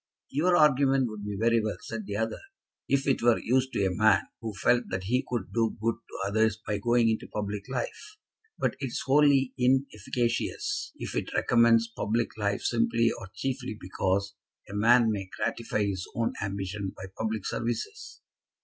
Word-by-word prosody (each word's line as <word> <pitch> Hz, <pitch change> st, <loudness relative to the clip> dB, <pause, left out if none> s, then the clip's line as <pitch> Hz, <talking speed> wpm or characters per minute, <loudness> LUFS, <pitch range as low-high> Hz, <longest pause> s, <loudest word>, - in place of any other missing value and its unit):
"Your 175 Hz, +5 st, +3 dB
argument 135 Hz, -3 st, +4 dB
would 105 Hz, -1 st, -7 dB
be 105 Hz, -1 st, -4 dB
very 115 Hz, 0 st, +3 dB
well," 110 Hz, -, -2 dB
said 110 Hz, -3 st, -6 dB
the 100 Hz, -, -3 dB
other, 110 Hz, +1 st, -2 dB, 0.5 s
"if 140 Hz, 0 st, +2 dB
it 135 Hz, -, +1 dB
were 120 Hz, -1 st, +4 dB
used 130 Hz, +2 st, +1 dB
to 100 Hz, -, +1 dB
a 95 Hz, -, 0 dB
man 110 Hz, 0 st, +4 dB, 0.2 s
who 115 Hz, -1 st, -4 dB
felt 120 Hz, +6 st, +2 dB
that 95 Hz, 0 st, -3 dB
he 125 Hz, +7 st, +1 dB
could 120 Hz, -7 st, -3 dB
do 115 Hz, -1 st, +1 dB
good 115 Hz, +2 st, +1 dB
to 105 Hz, -3 st, -6 dB
others 110 Hz, +1 st, +2 dB
by 105 Hz, -2 st, -3 dB
going 120 Hz, +2 st, +3 dB
into 110 Hz, -1 st, 0 dB
public 105 Hz, +1 st, -4 dB
life. 135 Hz, -, -5 dB, 0.4 s
But -, -, 0 dB
it 135 Hz, -, -2 dB
is 120 Hz, -, -4 dB
wholly 140 Hz, -1 st, +4 dB
inefficacious 130 Hz, -, 0 dB
if -, -, -6 dB
it -, -, -2 dB
recommends 115 Hz, -1 st, +4 dB
public 115 Hz, +1 st, -2 dB
life 100 Hz, -2 st, -1 dB
simply 175 Hz, -, +2 dB
or 105 Hz, -5 st, -9 dB
chiefly 130 Hz, -4 st, -3 dB
because 95 Hz, +2 st, -1 dB, 0.3 s
a -, -, -9 dB
man 115 Hz, +2 st, +5 dB
may 95 Hz, -3 st, -4 dB
gratify 115 Hz, -2 st, -1 dB
his 95 Hz, -3 st, -3 dB
own 115 Hz, 0 st, 0 dB
ambition 95 Hz, 0 st, -3 dB
by -, -, -8 dB
public 110 Hz, -2 st, -2 dB
services." 120 Hz, -1 st, -4 dB
115 Hz, 175 wpm, -28 LUFS, 105-125 Hz, 0.5 s, man